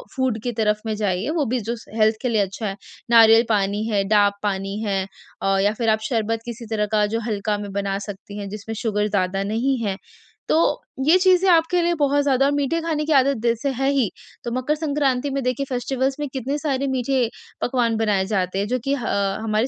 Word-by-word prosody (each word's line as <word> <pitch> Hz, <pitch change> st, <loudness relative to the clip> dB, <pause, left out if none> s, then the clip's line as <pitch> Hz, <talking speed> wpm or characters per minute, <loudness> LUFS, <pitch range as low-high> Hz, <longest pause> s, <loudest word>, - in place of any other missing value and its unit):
Food 260 Hz, -5 st, 0 dB
की 245 Hz, -, -1 dB
तरफ 210 Hz, 0 st, +2 dB
में 215 Hz, -1 st, -1 dB
जाइए, 205 Hz, +2 st, -1 dB
वो 310 Hz, -3 st, 0 dB
भी 250 Hz, +2 st, 0 dB
जो 230 Hz, +2 st, -3 dB
से 225 Hz, -1 st, -12 dB
हेल्थ 220 Hz, 0 st, +4 dB
के 250 Hz, -, 0 dB
लिए 220 Hz, -3 st, +2 dB
अच्छा 200 Hz, +3 st, -3 dB
है। 195 Hz, -, -3 dB, 0.4 s
नारियल 225 Hz, 0 st, +7 dB
पानी 205 Hz, 0 st, +1 dB
है, 205 Hz, -3 st, +1 dB
डाब 205 Hz, -1 st, +4 dB
पानी 195 Hz, 0 st, -2 dB
है 195 Hz, -2 st, 0 dB, 0.4 s
अ, 195 Hz, 0 st, +2 dB
या 205 Hz, +1 st, +2 dB
फिर 230 Hz, -2 st, +1 dB
आप 220 Hz, 0 st, +3 dB
शरबत 225 Hz, -1 st, 0 dB
किसी 235 Hz, 0 st, -7 dB
तरह 210 Hz, -1 st, +1 dB
का 210 Hz, -1 st, +3 dB
जो -, -, +1 dB
हल्का 210 Hz, -1 st, -1 dB
में 205 Hz, -1 st, -6 dB
बना 200 Hz, -1 st, -1 dB
सकती 205 Hz, 0 st, -8 dB
हैं, 200 Hz, -1 st, -5 dB
जिसमें 215 Hz, +2 st, -6 dB
शुगर 210 Hz, -2 st, 0 dB
ज़्यादा 195 Hz, -1 st, 0 dB
नहीं 235 Hz, +7 st, 0 dB
है। 195 Hz, -1 st, -2 dB, 0.5 s
तो -, -, +4 dB, 0.5 s
ये 325 Hz, +5 st, +6 dB
चीज़ें 370 Hz, 0 st, +4 dB
आपके 340 Hz, +1 st, +4 dB
लिए 345 Hz, 0 st, +2 dB
बहुत 285 Hz, 0 st, +3 dB
ज़्यादा 275 Hz, 0 st, +3 dB
मीठे 285 Hz, +3 st, 0 dB
खाने 315 Hz, -2 st, -1 dB
की 315 Hz, -, -2 dB
आदत 275 Hz, -1 st, +4 dB
जैसे 235 Hz, +3 st, +1 dB
है 270 Hz, 0 st, +2 dB
ही, 265 Hz, -8 st, +1 dB, 0.3 s
तो 235 Hz, -, -4 dB
मकर 255 Hz, +5 st, 0 dB
संक्रांति 285 Hz, -3 st, 0 dB
में 275 Hz, 0 st, -1 dB
देखिए 255 Hz, +2 st, -1 dB
फेस्टिवल्स 260 Hz, +1 st, -1 dB
में 295 Hz, -, -2 dB
कितने 270 Hz, +2 st, -2 dB
सारे 280 Hz, -2 st, -1 dB
मीठे 260 Hz, -2 st, 0 dB, 0.3 s
पकवान 240 Hz, -3 st, +1 dB
बनाए 210 Hz, -4 st, +1 dB
जाते 190 Hz, -2 st, -1 dB
हैं, 200 Hz, -, -1 dB
जो 255 Hz, +3 st, -1 dB
कि 275 Hz, -, +1 dB
ह 250 Hz, -, -5 dB, 0.4 s
हमारे 220 Hz, +2 st, +1 dB
230 Hz, 215 wpm, -22 LUFS, 210-270 Hz, 0.5 s, नारियल